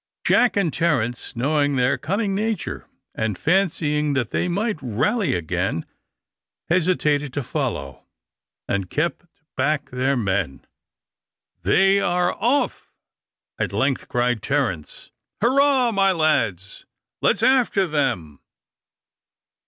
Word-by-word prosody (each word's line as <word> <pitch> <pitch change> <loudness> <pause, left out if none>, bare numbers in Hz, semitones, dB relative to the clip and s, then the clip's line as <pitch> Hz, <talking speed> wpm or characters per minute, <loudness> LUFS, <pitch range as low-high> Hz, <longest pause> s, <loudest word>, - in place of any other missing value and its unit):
Jack 245 -4 +3
and 175 -6 +1
Terence, 120 -8 -1
knowing 145 +3 +1
their 125 -1 +2
cunning 200 +3 -2
nature, 215 +2 -3 0.3
and 110 -3 -2
fancying 150 -4 +1
that 125 -5 -1
they - - 0
might 200 -1 -1
rally 130 - 0
again, 85 0 -2 0.8
hesitated 155 -5 +1
to 145 - -2
follow, 120 - -4 0.6
and 100 -2 -2
kept 170 - -2 0.3
back 145 +2 0
their 130 +2 0
men. 95 - -2 1.0
"They 195 - +4
are 180 -1 +1
off," 250 +7 -1 0.7
at - - -1
length 135 -1 0
cried 120 -2 0
Terence. 120 - -2 0.3
"Hurrah, 260 +1 +3
my 195 -2 +3
lads. 115 - 0 0.3
Let's - - +2
after 250 -6 +3
them!" 130 - -2
145 Hz, 105 wpm, -22 LUFS, 120-195 Hz, 1.0 s, They